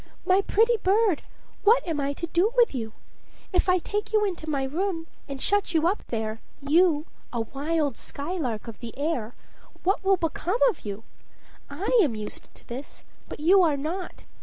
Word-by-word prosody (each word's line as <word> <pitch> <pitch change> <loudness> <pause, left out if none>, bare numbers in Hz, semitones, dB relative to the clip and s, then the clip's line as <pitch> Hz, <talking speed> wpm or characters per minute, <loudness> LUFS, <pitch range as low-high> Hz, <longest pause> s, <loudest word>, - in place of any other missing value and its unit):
"My 375 +2 +4
pretty 455 +4 +3
bird, 400 -2 +2 0.4
what 440 -1 +5
am 320 -3 -1
I 280 0 0
to 335 - -4
do 345 +6 +2
with 475 -7 +5
you? 225 -4 -4 0.6
If 365 +1 +2
I 365 - +5
take 415 +4 -3
you 430 -1 +3
into 350 -5 -4
my 280 -3 0
room 330 +4 -2 0.2
and 275 -2 -6
shut 405 +2 +1
you 320 0 +3
up 390 +4 0
there, 220 -1 -3 0.2
you, 305 +1 +3 0.3
a 235 - -1
wild 285 +2 -1
skylark 280 - -4
of 230 - -8
the 235 0 -8
air, 275 -7 -2 0.5
what 390 +2 +1
will 385 0 +4
become 345 +4 -1
of - - -15
you? 205 +1 -5 0.7
I 390 +12 +1
am 280 - +2
used 210 -1 -7
to - - -17
this, 255 +4 -8 0.3
but - - -7
you 370 +6 +6
are 315 -5 +3
not. 335 +6 -5
325 Hz, 180 wpm, -26 LUFS, 275-385 Hz, 0.7 s, you